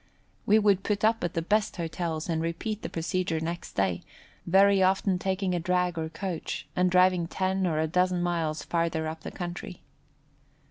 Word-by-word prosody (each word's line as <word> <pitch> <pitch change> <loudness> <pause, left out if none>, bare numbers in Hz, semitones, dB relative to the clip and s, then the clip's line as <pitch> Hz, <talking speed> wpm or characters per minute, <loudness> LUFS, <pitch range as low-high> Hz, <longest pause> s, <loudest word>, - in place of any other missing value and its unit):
We 210 - +6
would 205 -3 +3
put 205 -1 -1
up 225 -1 +2
at 175 - -2
the 165 - 0
best 210 +4 +1
hotels 165 -1 -3
and 165 -2 -1
repeat 185 +6 -3
the - - -5
procedure 165 0 -1
next 170 +2 -5
day, 95 -3 0 0.5
very 195 +2 +5
often 190 0 +2
taking 190 0 -1
a 175 - 0
drag 180 0 0
or 160 -1 -3
coach, 170 +1 -5
and 180 0 +3
driving 180 -1 +4
ten 190 +1 0
or 160 -3 0
a 160 - +2
dozen 180 +2 +1
miles 165 -3 -1
farther 165 -2 -1
up 160 0 -6
the - - -6
country. 175 -1 -7
175 Hz, 180 wpm, -28 LUFS, 165-190 Hz, 0.5 s, We